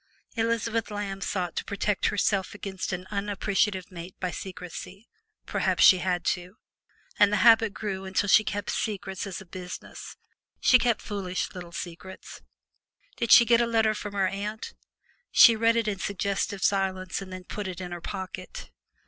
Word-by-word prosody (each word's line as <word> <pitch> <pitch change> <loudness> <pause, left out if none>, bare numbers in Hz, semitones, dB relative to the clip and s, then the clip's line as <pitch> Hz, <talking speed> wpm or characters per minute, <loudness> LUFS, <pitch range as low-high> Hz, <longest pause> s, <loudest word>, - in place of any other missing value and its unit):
Elizabeth 230 0 0
Lamb 205 -2 -4
sought 180 -4 -2
to - - -2
protect 200 0 -1
herself 200 -1 0
against 195 -2 -5
an 180 0 -4
unappreciative 200 -2 -1
mate 175 +1 -9
by 185 -1 -2
secrecy 190 +3 -8 0.4
(perhaps - - +1
she 185 - +8
had 180 -2 -1
to), 180 +2 -2 0.6
and 205 -1 +6
the 210 - +2
habit 225 -2 +6
grew 195 -2 -4
until 190 +2 0
she 215 +2 +6
kept 205 -1 -3
secrets 195 -3 -3
as 190 - -5
a - - -12
business 180 0 -9 0.4
she 255 - +6
kept 235 -3 +1
foolish 195 -2 -3
little 175 -2 -8
secrets. 175 +2 -8 0.8
Did 235 - -1
she 235 - +9
get 235 0 +4
a 235 - +1
letter 225 -2 +2
from 205 -1 -6
her 195 -1 +2
aunt, 205 +3 -5 0.6
she 230 - +8
read 230 +1 +3
it 230 -2 +1
in 200 -3 -2
suggestive 200 +1 -2
silence 190 -1 0
and 190 -1 -9
then 185 0 -7
put 205 +2 -5
it 185 -1 -6
in 180 -1 -6
her 175 -1 -6
pocket. 195 - -7
195 Hz, 165 wpm, -27 LUFS, 185-210 Hz, 0.8 s, she